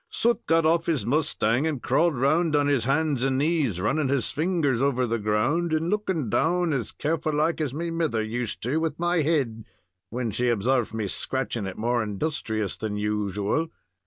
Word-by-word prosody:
Soot 235 Hz, +1 st, +1 dB
got 165 Hz, 0 st, +3 dB
off 165 Hz, +1 st, +2 dB
his 160 Hz, -5 st, 0 dB
mustang 140 Hz, -2 st, +1 dB
and 150 Hz, -4 st, -2 dB
crawled 170 Hz, +5 st, +2 dB
round 155 Hz, +5 st, +2 dB
on 145 Hz, -1 st, +3 dB
his 140 Hz, -5 st, +1 dB
hands 145 Hz, -1 st, +1 dB
and 135 Hz, 0 st, +1 dB
knees, 145 Hz, -, +1 dB
running 135 Hz, +10 st, +1 dB
his 135 Hz, -1 st, 0 dB
fingers 150 Hz, -6 st, 0 dB
over 130 Hz, -2 st, +2 dB
the 115 Hz, 0 st, -1 dB
ground, 120 Hz, +12 st, +1 dB
and 160 Hz, +3 st, 0 dB
looking 190 Hz, -, -1 dB
down 170 Hz, +7 st, +1 dB
as 125 Hz, -6 st, -2 dB
careful 155 Hz, 0 st, -2 dB
like 160 Hz, +2 st, +1 dB
as 150 Hz, -4 st, -1 dB
me 165 Hz, +4 st, -3 dB
mither 160 Hz, -10 st, 0 dB
used 115 Hz, +1 st, -4 dB
to 120 Hz, -, -2 dB
do 155 Hz, -, +2 dB
with 160 Hz, -2 st, -2 dB
my 175 Hz, +1 st, +1 dB
head 135 Hz, -8 st, 0 dB, 0.5 s
when 120 Hz, -1 st, -2 dB
she 125 Hz, +4 st, 0 dB
obsarved 120 Hz, +1 st, +1 dB
me 110 Hz, -2 st, -2 dB
scratching 120 Hz, -1 st, -2 dB
it 95 Hz, -, -7 dB
more 120 Hz, +2 st, +1 dB
industrious 110 Hz, -, -2 dB
than 105 Hz, -2 st, -3 dB
usual. 105 Hz, -, -1 dB
140 Hz, 190 wpm, -25 LUFS, 115-160 Hz, 0.5 s, got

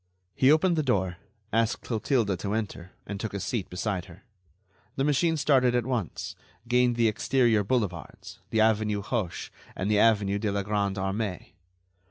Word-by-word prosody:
He 130 Hz, +2 st, +4 dB
opened 170 Hz, +2 st, +3 dB
the -, -, +3 dB
door, 95 Hz, -10 st, 0 dB, 0.4 s
asked 115 Hz, 0 st, +1 dB
Clotilde 110 Hz, -4 st, 0 dB
to 100 Hz, +1 st, -3 dB
enter, 95 Hz, -5 st, -5 dB
and 100 Hz, 0 st, -5 dB
took 110 Hz, -2 st, -4 dB
a -, -, -2 dB
seat 100 Hz, +1 st, -3 dB
beside 90 Hz, 0 st, -2 dB
her. 90 Hz, +3 st, -15 dB, 0.7 s
The 135 Hz, -, 0 dB
machine 160 Hz, +3 st, +2 dB
started 130 Hz, -4 st, +3 dB
at 120 Hz, -2 st, +1 dB
once, 120 Hz, -, -3 dB, 0.3 s
gained 125 Hz, 0 st, +3 dB
the 115 Hz, -1 st, +3 dB
exterior 110 Hz, 0 st, +2 dB
boulevards, 100 Hz, -7 st, -3 dB
the 110 Hz, -, +2 dB
avenue 105 Hz, -2 st, +2 dB
Hoche 105 Hz, -6 st, -3 dB, 0.2 s
and 100 Hz, +3 st, -1 dB
the 105 Hz, -, +4 dB
avenue 100 Hz, -3 st, +3 dB
de 105 Hz, -1 st, -1 dB
la 100 Hz, 0 st, -1 dB
Grande 100 Hz, -1 st, 0 dB
Armée. 95 Hz, 0 st, -3 dB
110 Hz, 165 wpm, -27 LUFS, 100-125 Hz, 0.7 s, He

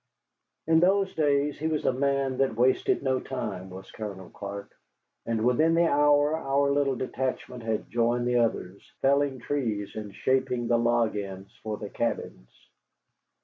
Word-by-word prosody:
In 160 Hz, 0 st, +4 dB
those 195 Hz, +2 st, +3 dB
days 145 Hz, -1 st, +1 dB
he 155 Hz, -, -1 dB
was 155 Hz, -2 st, -1 dB
a -, -, +3 dB
man 135 Hz, 0 st, 0 dB
that 135 Hz, -4 st, +1 dB
wasted 125 Hz, +4 st, +2 dB
no 130 Hz, -1 st, +1 dB
time, 100 Hz, -9 st, -5 dB
was 95 Hz, +1 st, -10 dB
Colonel 100 Hz, -4 st, -7 dB
Clark, 100 Hz, 0 st, -7 dB, 0.5 s
and 115 Hz, -1 st, 0 dB
within 155 Hz, +7 st, +3 dB
the 170 Hz, +1 st, +4 dB
hour 145 Hz, 0 st, +4 dB
our 140 Hz, -2 st, +1 dB
little 140 Hz, -1 st, +1 dB
detachment 130 Hz, -1 st, -3 dB
had 110 Hz, -1 st, -2 dB
joined 120 Hz, +1 st, +1 dB
the 125 Hz, 0 st, +2 dB
others, 100 Hz, -5 st, -1 dB, 0.2 s
felling 140 Hz, 0 st, +3 dB
trees 115 Hz, -6 st, -3 dB
and 105 Hz, -2 st, -7 dB
shaping 130 Hz, -2 st, 0 dB
the 120 Hz, -, +3 dB
log 120 Hz, -2 st, +2 dB
ends 95 Hz, -1 st, -6 dB
for 110 Hz, -1 st, -4 dB
the 105 Hz, -1 st, -7 dB
cabins. 115 Hz, -, -3 dB
125 Hz, 155 wpm, -27 LUFS, 110-140 Hz, 0.5 s, In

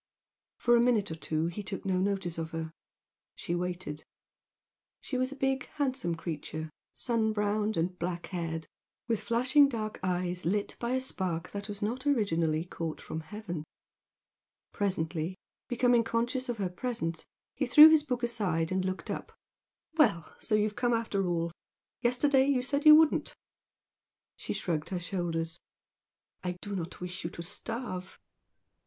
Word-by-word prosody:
For 240 Hz, 0 st, +4 dB
a 235 Hz, -, +5 dB
minute 230 Hz, -6 st, +2 dB
or -, -, -3 dB
two 155 Hz, 0 st, -1 dB
he 175 Hz, +5 st, -3 dB
took 195 Hz, -1 st, -6 dB
no 185 Hz, -1 st, +1 dB
notice 190 Hz, -3 st, -1 dB
of 160 Hz, -1 st, -3 dB
her. 160 Hz, 0 st, -5 dB, 0.6 s
She 170 Hz, -, -4 dB
waited. 175 Hz, -3 st, -3 dB, 1.0 s
She 265 Hz, -, -5 dB
was 255 Hz, +1 st, +1 dB
a -, -, -6 dB
big 270 Hz, -1 st, 0 dB
handsome 260 Hz, -, 0 dB
creature, 160 Hz, -1 st, -5 dB, 0.2 s
sun 225 Hz, -2 st, +1 dB
browned 210 Hz, 0 st, 0 dB
and 180 Hz, +2 st, -1 dB
black 175 Hz, 0 st, -2 dB
haired, 165 Hz, -3 st, -3 dB, 0.4 s
with 225 Hz, -3 st, 0 dB
flashing 255 Hz, +5 st, +4 dB
dark 215 Hz, -4 st, -4 dB
eyes 180 Hz, -1 st, -1 dB
lit 200 Hz, +5 st, 0 dB
by 240 Hz, +1 st, -1 dB
a 260 Hz, -, +1 dB
spark 180 Hz, -9 st, -2 dB
that 200 Hz, +1 st, -5 dB
was 205 Hz, 0 st, -5 dB
not 250 Hz, +6 st, -2 dB
originally 165 Hz, -, +2 dB
caught 165 Hz, -2 st, -4 dB
from 160 Hz, -, -5 dB
heaven. 175 Hz, -1 st, -6 dB, 1.1 s
Presently, 170 Hz, -3 st, -1 dB, 0.3 s
becoming 245 Hz, -1 st, +3 dB
conscious 240 Hz, +3 st, -1 dB
of 240 Hz, -, -1 dB
her 195 Hz, -3 st, 0 dB
presence, 175 Hz, -5 st, -3 dB, 0.3 s
he 270 Hz, -, -1 dB
threw 300 Hz, +5 st, +11 dB
his 315 Hz, -1 st, +6 dB
book 250 Hz, -4 st, -3 dB
aside 185 Hz, -9 st, 0 dB
and 185 Hz, 0 st, +1 dB
looked 185 Hz, 0 st, -3 dB
up. -, -, -5 dB, 0.7 s
"Well! 170 Hz, -, +3 dB
So 215 Hz, -, +1 dB
you've 210 Hz, 0 st, +1 dB
come 245 Hz, -1 st, +1 dB
after 210 Hz, -4 st, 0 dB
all! 170 Hz, -1 st, 0 dB, 0.5 s
Yesterday 265 Hz, +2 st, +4 dB
you 265 Hz, -3 st, +2 dB
said 280 Hz, +3 st, +1 dB
you 305 Hz, -, +12 dB
wouldn't." 315 Hz, -1 st, +3 dB, 1.0 s
She -, -, -4 dB
shrugged 160 Hz, -4 st, -1 dB
her 185 Hz, -, -2 dB
shoulders. 170 Hz, -2 st, -2 dB, 0.8 s
"I 180 Hz, -1 st, -2 dB
do 205 Hz, -1 st, -4 dB
not 175 Hz, -1 st, -5 dB
wish 180 Hz, 0 st, -5 dB
you 165 Hz, -, -2 dB
to 170 Hz, -, -7 dB
starve." 190 Hz, -1 st, -5 dB
200 Hz, 155 wpm, -30 LUFS, 170-240 Hz, 1.1 s, you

